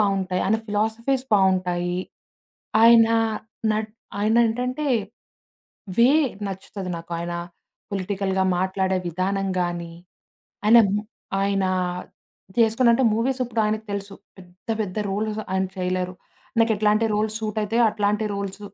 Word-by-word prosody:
బావుంటాయి. 195 -3 +1
ఆయన 220 +2 +2
ఫిలాసఫీస్ 225 +5 0
బావుంటాయి. 180 -2 +1 0.8
ఆయన 230 -1 +8 0.6
నట్ 215 0 -2 0.3
ఆయన 220 +2 +2
ఏంటంటే 250 +6 -2 1.1
వే 240 +3 +7 0.4
నచ్చుతది 190 -1 -6
నాకు 170 +1 -9
ఆయన, 170 0 -4 0.6
పొలిటికల్‌గా 190 0 -1
మాట్లాడే 190 0 0
విధానం 195 +3 -1
గానీ. 170 -1 -3 0.7
ఆయనా 230 +2 +8 0.2
ము 210 - -2 0.4
ఆయన 195 -1 +1 0.9
జేసుకున్నంటే 235 +2 +4
మూవీస్ 255 +4 0
ఇప్పుడాయనకి 220 -2 -1
తెలుసు. 200 0 -5 0.2
పెద్ద 180 +2 -18
పెద్ద 200 -1 -3
రోల్స్ 215 +2 -2
ఆయన 190 0 +1
చేయలేరు. 185 0 -2 0.5
నాకెట్లాంటి 215 0 +3
రోల్స్ 215 +1 0
సూట్ 215 -1 -3
అయితాయో 230 +3 +2
అట్లాంటి 210 +1 0
రోల్స్ 200 0 -5
205 Hz, 110 wpm, -23 LUFS, 190-220 Hz, 1.1 s, ఆయన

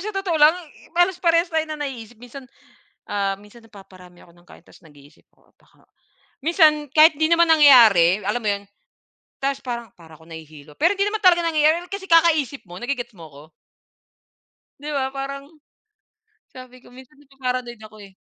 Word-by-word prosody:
sa 415 - -6
totoo 360 -5 -2
lang, 305 +4 +5
i 335 -5 -16
halos 355 +1 +1
parehas 335 0 +1
tayo 320 - +1
ng 310 - -6
naiisip, 240 -4 -9
minsan, 245 +3 -13 0.6
ah, 195 -1 -3
minsan 210 +3 -18
napaparami 185 -5 -17
ako 170 - -22
ng 175 0 -25
kain - - -18
tas - - -21
nag-iisip 145 -2 -21
ako - - -34
baka - - -30 0.6
minsan 310 -4 +2
kahit 310 0 +5
'di 315 +2 0
naman 340 0 +3
nangyayari, 225 - +5
alam 210 +4 -3
mo - - -1
'yon. 200 0 -6 0.8
Tas 275 0 -2
parang, 235 -2 -6
"Para 160 -2 -17
akong 160 +1 -18
nahihilo." 155 -2 -13
Pero 340 +5 +2
hindi 400 +1 -1
naman 430 -1 -6
talaga 350 -1 +5
nangyayari 330 +1 0
kasi 395 -1 -7
kakaisip 320 -6 +2
mo, 175 - -10
nage-gets 245 -1 -6
mo 165 - -12
ko? 145 +1 -14 1.4
'Di 300 - -7
ba 270 - -1
parang 275 0 -6 1.1
sabi 255 0 -13
ko - - -19
minsan 260 +3 -17
napa-paranoid 255 -4 -6
ako 215 0 -14
eh. 190 - -25
265 Hz, 175 wpm, -21 LUFS, 200-320 Hz, 1.4 s, lang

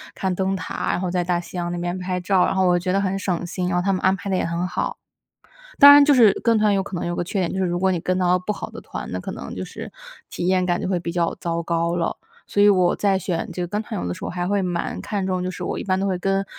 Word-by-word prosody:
看 190 -1 -1
灯 190 +1 -1
塔， 185 - -3
然 180 - -1
后 180 - -2
在 180 -1 0
大 175 -1 0
西 180 - -9
洋 175 0 -2
那 - - -3
边 175 +1 -3
拍 180 0 -3
照， 185 0 +3
然 - - -1
后 190 -1 +2
我 175 0 +3
觉 180 +1 -1
得 195 - +2
很 195 0 -1
省 180 -3 -2
心， 180 +1 -3
然 175 - 0
后 180 - +1
他 195 - +1
们 185 - 0
安 190 +1 +3
排 200 +1 -7
得 190 - +1
也 - - 0
很 170 +1 -2
好。 180 0 -2 0.8
当 285 0 +11
然 290 - +9
就 285 0 +5
是 225 -6 +7
跟 230 -1 +3
团 210 -1 +3
有 195 -1 +1
可 195 - -9
能 - - -3
有 175 - -2
个 175 - -2
缺 190 +2 -2
点， 175 - -1
就 190 - -3
是 190 - +1
如 175 0 -1
果 190 0 +2
你 175 - -1
跟 185 +2 -1
到 180 0 +3
不 195 +4 -3
好 - - -7
的 - - -9
团， - - -7
那 - - -3
可 - - -6
能 - - -7
就 - - -5
是 - - -9 0.4
体 175 - -3
验 185 0 +2
感 175 -1 0
觉 - - -3
会 185 -2 +1
比 170 -1 -5
较 170 -1 0
糟 170 0 -2
糕 170 0 0
了。 170 -1 -1 0.3
所 205 - +1
以 205 - +7
我 185 -3 +4
在 195 -2 +1
选 175 -2 -3
这 180 - -3
个 - - -2
跟 205 +4 -2
团 - - -5
游 90 - -3
的 90 - -2
时 - - -9
候， - - -3
还 175 0 -3
会 200 +1 +1
蛮 175 -2 -2
看 200 -3 -3
重 185 -1 -1
就 185 - -2
是 180 -1 -6
我 - - -3
一 - - -3
般 185 -1 0
都 195 - -1
会 185 -2 -1
跟 195 +2 0
185 Hz, 345 characters per minute, -22 LUFS, 175-195 Hz, 0.8 s, 当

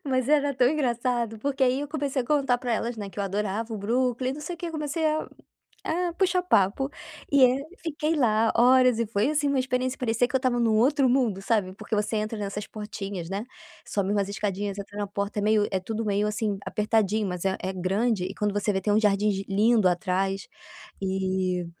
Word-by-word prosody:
mas 260 -2 0
era 285 -1 +3
tão 250 -1 +4
engraçado 240 -5 -1
porque 270 +3 -2
aí 260 +2 +3
eu 290 - -4
comecei 285 -3 -1
a 245 - -3
contar 275 -4 +2
pra 245 -1 -2
elas 235 +2 -2
né 205 -2 -5
que 195 +1 -11
eu - - 0
adorava 210 +3 -2
o 220 - -3
Brooklyn 250 +4 0
não 300 - -8
sei 350 +4 -4
o - - -15
que 340 0 -4
comecei 310 0 -2
a 310 0 0 0.6
a 350 +1 -1
puxar 365 0 +1
papo 230 - +2 0.4
e 280 -2 +6
é 250 0 +6 0.3
fiquei 310 -1 -1
lá 225 -5 +3
horas 250 0 +5
e 230 - 0
foi, 215 +6 +1
assim, 290 -1 +1
uma 280 -1 +1
experiência, 255 0 -1
parecia 235 0 +1
que 255 - -4
eu - - +7
estava 255 -2 0
num 225 -2 +3
outro 265 +4 +3
mundo 240 -7 +1
sabe, 195 -3 0
porque 210 +2 -4
você 210 +1 0
entra 215 +1 -2
nessas 205 0 -4
portinhas, 200 -4 -6
né. 200 +3 -3 0.4
Sobe 200 -1 -1
umas 200 -1 0
escadinhas 200 0 -3
entra 200 0 -8
na 205 0 -2
porta 200 +1 -3
é - - -1
meio 210 0 +3
é 190 - +1
tudo 220 +4 -4
meio 205 0 +1
assim 210 -1 -1
apertadinho 215 -1 +1
mas 180 0 -4
é 190 0 +1
é 190 - -2
grande 190 +2 0
e 190 +2 -6
quando 210 -1 -1
você 205 +1 0
vê 190 - 0
tem 205 +2 0
uns 215 - +3
jardins 200 -1 +2
lindo 215 0 +4
atrás, 190 +1 -1 0.5
e, 190 -2 -1
220 Hz, 215 wpm, -26 LUFS, 200-255 Hz, 0.6 s, eu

